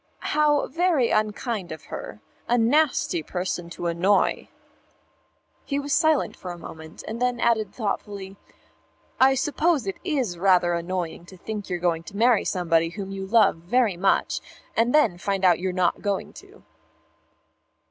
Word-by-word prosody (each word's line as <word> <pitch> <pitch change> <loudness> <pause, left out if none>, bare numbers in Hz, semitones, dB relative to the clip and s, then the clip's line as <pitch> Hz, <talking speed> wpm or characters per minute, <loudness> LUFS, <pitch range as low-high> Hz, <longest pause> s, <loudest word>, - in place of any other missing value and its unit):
"How 295 -1 +3
very 330 -5 +1
unkind 215 -2 -1
of 160 -1 -8
her. - - -8 0.3
A 240 - +2
nasty 250 - +2
person 180 +1 -4
to 175 - -7
annoy." 180 +4 +1 1.1
He 280 - -2
was 285 0 -2
silent 315 -3 +2
for 185 - -8
a 175 - -6
moment, 160 -1 -10
and 230 +2 -5
then 250 -1 +1
added 225 -4 +1
thoughtfully, 200 -3 -4 0.8
"I 265 +1 +6
suppose 295 - +1
it 195 - -4
is 260 - -1
rather 180 -2 +4
annoying 170 0 -3
to 185 - -13
think 210 +2 -6
you're 180 - -1
going 170 -2 0
to 200 - -9
marry 235 -1 +4
somebody 165 -2 +1
whom 195 +2 -7
you 195 0 -5
love 215 -4 +4
very 205 +4 +1
much, 190 +3 +1 0.3
and 230 +2 +2
then 270 -13 +3
find 195 0 -2 0.2
you're 185 +1 -1
not 180 -1 0
going 200 -2 -2
to." - - -15
200 Hz, 150 wpm, -24 LUFS, 180-250 Hz, 1.1 s, I